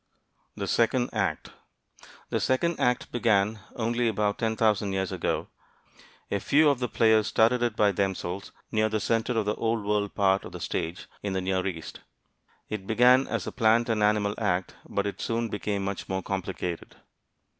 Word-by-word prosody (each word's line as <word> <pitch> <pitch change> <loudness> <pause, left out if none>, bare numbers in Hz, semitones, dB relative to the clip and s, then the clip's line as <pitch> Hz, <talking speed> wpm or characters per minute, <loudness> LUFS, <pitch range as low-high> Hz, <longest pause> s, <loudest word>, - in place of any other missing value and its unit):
THE - - -4
SECOND 120 +1 +2
ACT - - -1 0.8
The - - +1
second 165 +6 +1
act 125 0 +1
began 110 -3 +2 0.2
only 120 +1 0
about 105 -2 0
ten 110 -1 0
thousand 105 -3 +1
years 95 -1 -1
ago. - - -2 0.8
A 100 - +1
few 150 +8 +4
of 135 - -2
the 125 - -1
players 110 -2 +3
started 115 +4 +3
it 120 -3 0
by 105 -2 +4
themselves 95 -1 -2 0.2
near 110 -1 +2
the 110 0 0
center 115 +3 0
of 110 - +1
the 105 - +1
Old 115 -2 -1
World 105 -1 0
part 95 -1 +3
of - - -9
the - - -6
stage, 85 +4 -3 0.2
in 100 -2 -3
the 95 - -1
Near 95 0 0
East. 85 -4 -6 0.7
It 100 -3 -5
began 125 +4 +5
as - - -2
a - - -4
plant 115 0 +3
and 110 -2 +1
animal 105 -1 +2
act, 90 -4 -1
but 100 - -1
it 100 - -4
soon 115 0 -1
became 100 -1 -2
much 100 0 -4
more 95 0 -2
complicated. 95 -3 -4
105 Hz, 175 wpm, -27 LUFS, 100-115 Hz, 0.8 s, began